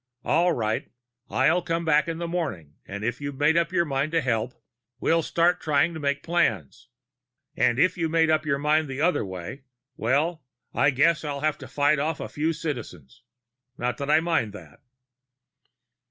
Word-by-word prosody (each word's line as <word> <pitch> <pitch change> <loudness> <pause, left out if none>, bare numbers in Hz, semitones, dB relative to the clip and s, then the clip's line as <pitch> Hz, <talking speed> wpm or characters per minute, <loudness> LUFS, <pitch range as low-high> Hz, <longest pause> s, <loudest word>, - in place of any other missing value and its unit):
All 170 +3 +3
right. 110 -7 -2 0.4
I'll 140 +7 +3
come 165 -1 -2
back 150 0 +3
in 165 -1 -3
the 170 0 -3
morning, 125 - -4
and 100 +1 -6
if 120 +4 -2
you've 140 -1 -5
made 150 +3 +3
up 170 0 +2
your 170 -2 +2
mind 140 +1 -1
to 165 - +3
help, 120 -2 -1 0.4
we'll 165 0 +2
start 170 +2 +1
trying 155 +2 +2
to 160 - -6
make 145 -1 -1
plans. 120 - -1 0.7
And 120 - +2
if 180 +5 +2
you've 165 -1 0
made 160 0 +3
up 155 0 +2
your 145 -3 0
mind 150 +2 +2
the 135 0 -5
other 175 +4 +2
way 95 +7 -7 0.3
well, 150 +7 0 0.3
I - - +3
guess 150 +5 +2
I'll 145 -2 -4
have 155 0 0
to - - -9
fight 145 +1 +2
off 155 +2 -1
a - - -4
few 155 +2 -1
Citizens. 120 - -6 0.6
Not 125 0 -2
that 140 0 -3
I 155 +1 +5
mind 160 -11 0
that." 105 - -13
150 Hz, 185 wpm, -25 LUFS, 130-165 Hz, 0.7 s, I